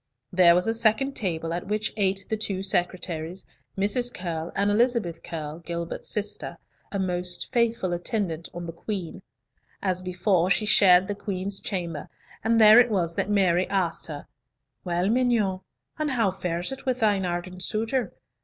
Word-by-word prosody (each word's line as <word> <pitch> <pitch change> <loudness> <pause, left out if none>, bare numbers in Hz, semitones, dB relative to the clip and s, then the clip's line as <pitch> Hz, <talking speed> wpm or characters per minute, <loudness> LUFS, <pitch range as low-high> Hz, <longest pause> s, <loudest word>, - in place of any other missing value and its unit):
There 175 -2 +6
was 180 - +3
a 225 - +2
second 230 +4 +2
table, 165 -5 -2
at 175 +2 -4
which 215 +1 -1
ate 195 -2 0
the 220 - -1
two 200 -3 -3
secretaries, 180 -2 -1 0.3
Mrs. 225 +5 +2
Curll, 170 -4 -4
and 200 +1 +2
Elizabeth 220 -7 +1
Curll, 155 -1 -6
Gilbert's 170 0 -5
sister, 210 0 -2 0.3
a 200 - -2
most 180 -2 -2
faithful 230 -6 +1
attendant 175 -2 -2
on 175 0 -7
the 165 - -5
Queen. 185 0 -5 0.6
As 185 -2 -1
before, 185 0 +1
she 215 +2 +2
shared 190 -3 +6
the 205 - -1
Queen's 195 -1 -4
chamber, 170 -6 -4 0.3
and 225 +1 +3
there 215 +1 +9
it 245 0 +5
was 175 -6 0
that 195 - -2
Mary 185 -3 +2
asked 190 -4 -1
her, 145 -3 -7 0.6
"Well, 175 +1 0
mignonne, 225 -5 +2 0.4
and 305 -1 0
how 230 -7 +1
fares 175 0 -3
it 270 - -7
with 255 -1 0
thine 205 -3 +3
ardent 180 +1 -4
suitor? 225 +2 -1
190 Hz, 165 wpm, -26 LUFS, 175-215 Hz, 0.6 s, there